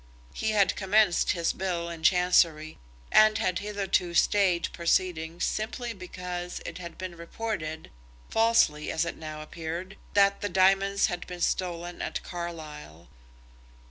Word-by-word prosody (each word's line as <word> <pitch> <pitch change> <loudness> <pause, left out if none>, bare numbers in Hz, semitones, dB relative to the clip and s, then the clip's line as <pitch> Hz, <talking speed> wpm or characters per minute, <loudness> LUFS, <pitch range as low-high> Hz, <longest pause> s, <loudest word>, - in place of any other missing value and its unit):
He 220 - -1
had 210 -2 +3
commenced 200 -2 +3
his 170 -2 0
bill 175 -3 -2
in 170 -1 -7
Chancery, 165 - +3 0.3
and 215 0 +6
had 185 -4 0
hitherto 195 -4 -1
stayed 185 -2 +3
proceedings 170 -1 0
simply 235 +2 -3
because 180 -2 -6
it 170 +1 -6
had 170 -2 -8
been 185 -2 -6
reported, 170 -3 -5 0.4
falsely, 225 -10 +3
as 160 - 0
it 165 - -4
now 155 -1 -7
appeared, 170 +5 -6 0.2
that 200 0 +4
the 205 - -1
diamonds 195 +2 +3
had 175 -1 -4
been 180 -1 -7
stolen 175 -1 -2
at - - -3
Carlisle. 155 - -8
180 Hz, 135 wpm, -28 LUFS, 165-195 Hz, 0.4 s, and